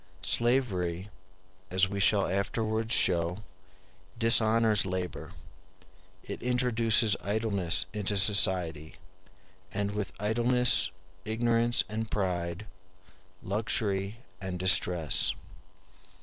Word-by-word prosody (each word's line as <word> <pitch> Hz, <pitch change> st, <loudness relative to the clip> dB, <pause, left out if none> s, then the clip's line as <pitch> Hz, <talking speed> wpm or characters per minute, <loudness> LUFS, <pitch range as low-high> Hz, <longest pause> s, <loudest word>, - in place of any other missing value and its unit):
Slavery, 100 Hz, -7 st, 0 dB, 0.6 s
as 95 Hz, +1 st, +2 dB
we 100 Hz, +1 st, -5 dB
shall 100 Hz, 0 st, +3 dB
afterwards 110 Hz, +3 st, -2 dB
show, 90 Hz, -1 st, +2 dB, 0.7 s
dishonors 115 Hz, -2 st, +5 dB
labor; 95 Hz, -1 st, -5 dB, 0.9 s
it -, -, -8 dB
introduces 115 Hz, -3 st, +1 dB
idleness 100 Hz, -4 st, +1 dB
into 105 Hz, -1 st, -1 dB
society, 95 Hz, -6 st, +1 dB, 0.8 s
and 100 Hz, 0 st, -3 dB
with 105 Hz, -2 st, -4 dB
idleness, 120 Hz, +4 st, +2 dB, 0.3 s
ignorance 115 Hz, +1 st, +1 dB
and 110 Hz, +2 st, -5 dB
pride, 90 Hz, -1 st, -3 dB, 0.8 s
luxury 100 Hz, 0 st, -2 dB, 0.2 s
and 95 Hz, -1 st, -5 dB
distress. 90 Hz, -4 st, +1 dB
105 Hz, 80 wpm, -28 LUFS, 95-115 Hz, 0.9 s, dishonors